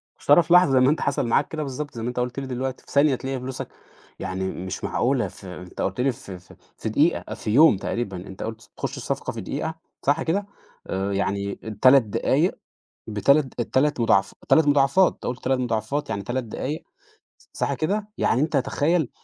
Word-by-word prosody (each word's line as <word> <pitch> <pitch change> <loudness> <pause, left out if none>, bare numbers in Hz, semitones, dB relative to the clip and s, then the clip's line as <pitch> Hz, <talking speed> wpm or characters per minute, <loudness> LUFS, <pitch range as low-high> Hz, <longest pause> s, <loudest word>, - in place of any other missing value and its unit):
يا - - -42
ترى 145 +4 +7
في 170 - +1
لحظة 180 -5 +7
زي 130 - +5
ما 130 +1 +5
أنت 155 - +1
حصل 140 -3 0
معاك 135 +5 +2
كده 155 -1 -4
بالضبط، 145 +1 -5
زي 115 - -5
ما 115 - -3
أنت 125 - -4
قُلت 125 +2 -2
لي 135 - -5
دلوقتي، 130 0 -4
في - - -15
ثانية 140 -1 +4
تلاقي 135 +1 -4
فلوسك 130 +1 -5 0.5
يعني 95 0 -3
مش 95 +1 -6
معقولة، - - +1
ف - - -13
أنت 90 -1 -8
قلت 95 +5 -1
لي 135 +1 +3
في 95 -6 -10
في 90 - -18 0.2
في - - -3
دقيقة، - - +1
في 105 - -4
يوم 145 -1 +6
تقريبًا، 100 -1 -3
أنت 95 - -7
قلت 110 0 -7
تخش - - -4
الصفقة - - -3
في - - -5
دقيقة 160 - -3 0.3
صح 145 +4 +1
كده؟ 195 +5 0 0.4
آآ، 95 +1 -2
يعني 100 0 -1 0.3
3 130 0 +7
دقايق 105 - +1 0.5
ب3 140 +8 +3
ال3 130 +4 +1
مضاعف 100 -4 +3 0.2
3 160 -2 +5
مضاعفات، 145 +6 +4
أنت - - -13
قُلت 125 0 -4
3 130 0 +1
مضاعفات 120 +4 -2
يعني 100 - -2
3 120 +6 -2
دقايق 130 +7 -4 0.7
صح - - -1
كده؟ 205 +6 -1
يعني 125 - +2
أنت 155 -1 +1
تخيل 150 +2 +1
130 Hz, 200 wpm, -24 LUFS, 110-145 Hz, 0.7 s, ترى